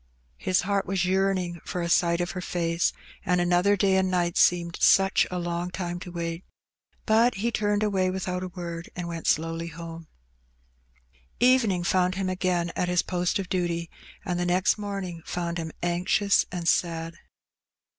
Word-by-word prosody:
His 185 -1 +1
heart 200 +1 -1
was 185 -1 0
yearning 185 -2 0
for 180 - -3
a - - -1
sight 170 0 +2
of 175 - -2
her 180 - -5
face, 170 -1 0 0.3
and 180 0 +1
another 180 +3 +3
day 190 0 +3
and 190 0 +2
night 175 -2 0
seemed 170 -1 +2
such 195 0 +5
a 180 - -3
long 175 0 -2
time 175 -1 -4
to 180 - -8
wait; 170 0 -4 0.6
but 230 +3 +4
he 230 +5 -1
turned 210 -1 0
away 190 -3 +1
without 185 -1 -3
a 185 - -3
word, 170 -2 -7
and 175 -1 -4
went 165 -1 -5
slowly 165 +1 0
homa 165 0 -9 1.3
Evening 235 -8 +3
found 180 +1 +2
him 190 -1 -1
again 180 -2 0
at 180 - 0
his 180 -1 +2
post 180 -1 0
of 195 -2 -4
duty, 170 -2 -2 0.3
and 180 -3 -1
the 175 - 0
next 180 +4 +2
morning 195 -5 -5
found 170 -1 -3
him 160 -1 -4
anxious 180 +4 +2
and 175 -2 -4
sad. 165 -1 +1
180 Hz, 170 wpm, -26 LUFS, 170-190 Hz, 1.3 s, such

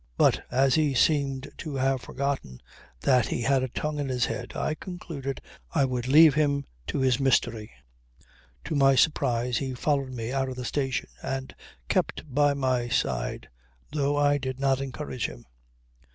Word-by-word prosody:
But - - +3
as 130 +1 +3
he 150 -4 +2
seemed 140 -1 +1
to 150 -3 -5
have 135 -1 +1
forgotten 135 - -3 0.4
that 125 -3 +3
he 120 - -2
had 135 +1 +3
a 130 - -1
tongue 150 +4 -3
in 140 -2 -2
his 125 -2 +1
head - - -5
I - - -1
concluded 155 -6 -6 0.3
I 140 - +4
would 125 -1 -2
leave 155 +2 +8
him 140 -2 +1 0.2
to - - -2
his 130 -1 +2
mystery. 120 -5 +1 0.9
To - - -4
my 135 -2 +5
surprise 125 -4 +2
he 130 -2 -3
followed 140 0 0
me 115 -1 -4
out 135 0 0
of 130 - -5
the 125 -1 -5
station 135 -2 -1
and 135 0 -4 0.3
kept - - 0
by 145 +1 +3
my 130 -3 0
side, 65 - -1 0.4
though 145 -1 0
I 145 0 +3
did 130 -1 -4
not 135 -1 +2
encourage 135 -1 -4
him. - - -11
135 Hz, 165 wpm, -27 LUFS, 125-145 Hz, 0.9 s, leave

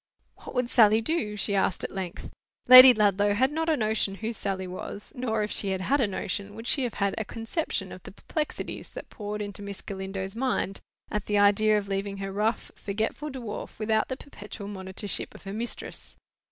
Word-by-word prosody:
"What - - -11
would 250 -1 +1
Sally 220 -3 +5
do?" 225 -5 -1
she 200 - +1
asked 195 -2 +1
at - - -4
length. 190 -3 -6 0.4
Lady 255 +1 +12
Ludlow 205 -2 +3
had 260 +5 +3
not 320 +2 -1
a 310 - +3
notion 215 -3 0
who 225 +3 -4
Sally 195 -3 -3
was. 185 +3 -7
Nor 225 -4 -1
if 210 - -3
she 200 - +1
had 190 -1 -1
had 275 +8 +2
a 230 - +3
notion, 200 +1 -4
would 225 +1 -8
she 265 +1 +2
have 240 - -4
had 200 -1 0
a - - 0
conception 225 +10 -3
of - - -9
the - - -10
perplexities 310 -3 -4
that - - -10
poured 210 0 -4
into 205 0 -6
Miss 200 -1 -6
Galindo's 195 0 -5
mind, 235 -5 -1 0.3
at 210 -1 -2
the 210 - +1
idea 205 +1 +5
of 200 -1 -3
leaving 195 0 -2
her 195 0 -4
rough 215 +3 -1
forgetful 220 +9 -3
dwarf 240 -6 -6
without 220 0 +1
the 260 - -4
perpetual 210 -7 -9
monitorship 190 0 -3
of - - -13
her 195 0 -6
mistress. 230 +3 -6
210 Hz, 200 wpm, -27 LUFS, 200-230 Hz, 0.4 s, Lady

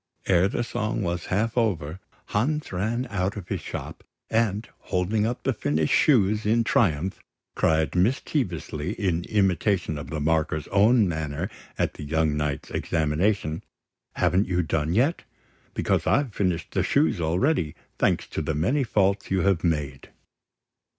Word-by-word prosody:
Ere 90 0 +4
the 115 - -1
song 115 -2 -2
was 85 -1 -2
half 110 +4 0
over, 95 -8 0 0.3
Hans 150 +9 0
ran 110 +7 -1
out 100 0 -1
of 95 - -8
his - - -2
shop, - - -7 0.3
and, 110 -1 +1
holding 100 +4 0
up 120 +2 -4
the 135 - +1
finished 75 -6 0
shoes 105 -6 +4
in 115 +2 +2
triumph, 95 -5 +1 0.3
cried 80 -1 +1
mischievously 90 - -1
in 90 -4 -1
imitation 95 -5 +1
of 75 - -8
the 80 - -3
marker's 80 0 0
own 105 +2 +4
manner 80 +3 -3 0.3
at - - 0
the - - -9
young 80 0 +1
knight's 75 -2 -2
examination, 80 +1 0 0.5
"Haven't 95 +3 +2
you 90 -1 +1
done 80 +1 -1
yet? 135 +9 +2 0.5
Because - - 0
I've 135 -6 +2
finished 90 -5 -1
the - - +1
shoes 80 +2 +2
already, 85 - +1 0.2
thanks - - +2
to - - -3
the 80 - -2
many 120 - +1
faults 100 -4 +1
you 95 -1 +1
have 95 -4 +2
made!" 75 -5 -2
95 Hz, 150 wpm, -25 LUFS, 80-110 Hz, 0.5 s, Ere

